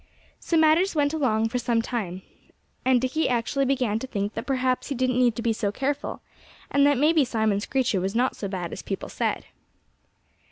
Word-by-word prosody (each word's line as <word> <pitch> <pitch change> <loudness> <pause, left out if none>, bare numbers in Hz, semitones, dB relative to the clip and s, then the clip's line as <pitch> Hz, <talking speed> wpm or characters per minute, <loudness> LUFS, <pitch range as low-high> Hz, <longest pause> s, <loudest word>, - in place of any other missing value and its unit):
So 335 - 0
matters 320 +4 +4
went 290 0 +2
along 225 -7 +1
for 250 +2 -1
some 235 -1 +1
time. 200 -6 -3 0.6
And 255 -1 +4
Dickie 260 +6 0
actually 250 +3 0
began 250 -5 0
to 265 - -6
think 205 -3 -3
that - - -6
perhaps 255 -2 0
he 280 - -3
didn't 255 0 +1
need 240 -3 +3
to 230 - -4
be 230 -2 +2
so 210 -2 -1
careful, 275 +6 -3 0.5
and 280 0 +4
that 285 -2 +3
maybe 305 +2 +4
Simon 220 -5 0
Screecher 230 -4 0
was 195 +3 -2
not 250 +2 +1
so 200 - -4
bad 180 -3 -4
as - - -6
people 195 - -5
said. - - -2
250 Hz, 195 wpm, -25 LUFS, 220-275 Hz, 0.6 s, matters